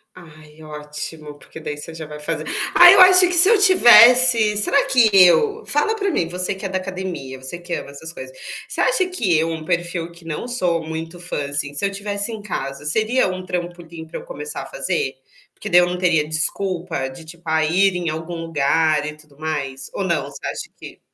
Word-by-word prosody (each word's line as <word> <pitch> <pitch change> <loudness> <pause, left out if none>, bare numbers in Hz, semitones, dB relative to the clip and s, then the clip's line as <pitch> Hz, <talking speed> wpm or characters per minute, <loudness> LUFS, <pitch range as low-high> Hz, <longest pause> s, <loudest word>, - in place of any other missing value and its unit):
Ai, 155 -3 -16
ótimo. 150 0 -8
Porque 160 - -13
daí, 150 -2 -6
você 150 - -9
já 160 -1 -8
vai 150 0 -10
fazer 150 - -4 0.3
Ah, 350 0 +9
eu 390 0 +7
acho 370 0 +8
que 360 -1 +2
se 355 +3 +6
eu 455 - +5
tivesse, 245 - +7
será 275 +7 +2
que 245 -4 +4
eu 415 - +4
fala 295 +10 0
pra 400 -3 -2
mim, 170 - -1
você 180 +3 -2
que 195 +1 -9
é - - -3
da 190 - -2
academia, 180 -9 -7
você 135 +6 -7
que 175 0 -8
ama - - -5
essas 160 +4 -9
coisas, 130 -2 -10 0.3
você - - -7
acha 385 -7 +2
que 230 - -1
eu 160 +1 0
um 160 -1 -6
perfil 170 0 -3
que 170 0 -17
não 165 +8 -6
sou 180 -9 -1
muito 165 +2 -7
fã, 175 -5 -5
assim, 145 0 -3
se 145 - -5
eu 200 - -1
tivesse 200 +2 -4
em 220 -2 -7
casa? 140 -7 -6
Seria 220 +11 +1
um 185 0 -5
trampolim 175 -2 -7
pra 160 - -8
eu - - -12
começar 480 -2 -7
a - - -8
fazer? 465 -3 -3 0.4
Porque - - -10
daí, 175 - +6
eu 175 - +3
não 180 - -4
teria 170 -4 +1
desculpa 170 -1 -2
de 135 +5 -12
tipo, 170 +2 -14
"A 160 0 +1
ir 185 +4 +2
em 175 -2 -3
algum 160 +2 -6
lugar 155 -1 0
e 150 - -7
tudo 150 -2 -19
mais?". 140 -4 -5
Ou 200 - -3
não? 170 -7 -1
Você 140 -1 -9
acha - - -5
que - - -12
175 Hz, 220 wpm, -20 LUFS, 155-210 Hz, 0.4 s, Ah